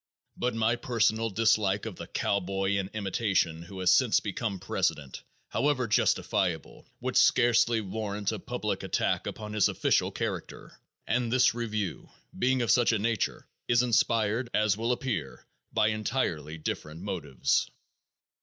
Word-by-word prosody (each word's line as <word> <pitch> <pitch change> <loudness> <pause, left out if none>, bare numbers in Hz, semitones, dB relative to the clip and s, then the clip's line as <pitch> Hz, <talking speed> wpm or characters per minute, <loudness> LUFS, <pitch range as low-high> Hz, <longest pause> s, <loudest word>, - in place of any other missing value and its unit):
But 125 -1 -1
my 115 +1 +1
personal 115 -2 +1
dislike 105 -2 +2
of - - -5
the - - -7
cowboy 95 0 -1
in 100 -1 -1
imitation 95 -5 0
who 90 +3 -10
has 90 0 +4
since 125 -5 +4
become 100 0 -3
president, 75 -6 -2 0.3
however 140 -3 +1
justifiable, 90 -6 0
would - - -3
scarcely 120 -1 +4
warrant 105 0 -3
a - - -4
public - - -3
attack - - -1
upon 105 -1 -6
his 105 -2 +3
official - - +1
character, - - -5 0.3
and 120 +1 0
this 130 -2 +4
review, 110 -5 -3 0.3
being 130 0 +2
of 115 - +2
such 120 +3 +4
a 115 - +2
nature, 110 0 -1 0.2
is 120 0 +4
inspired, 115 0 +1
as 105 -2 +3
will 115 +3 -1
appear, 115 - -3 0.3
by 105 - +2
entirely 85 - -2
different 75 +1 -5
motives. 85 -10 -1
105 Hz, 140 wpm, -28 LUFS, 95-115 Hz, 0.3 s, has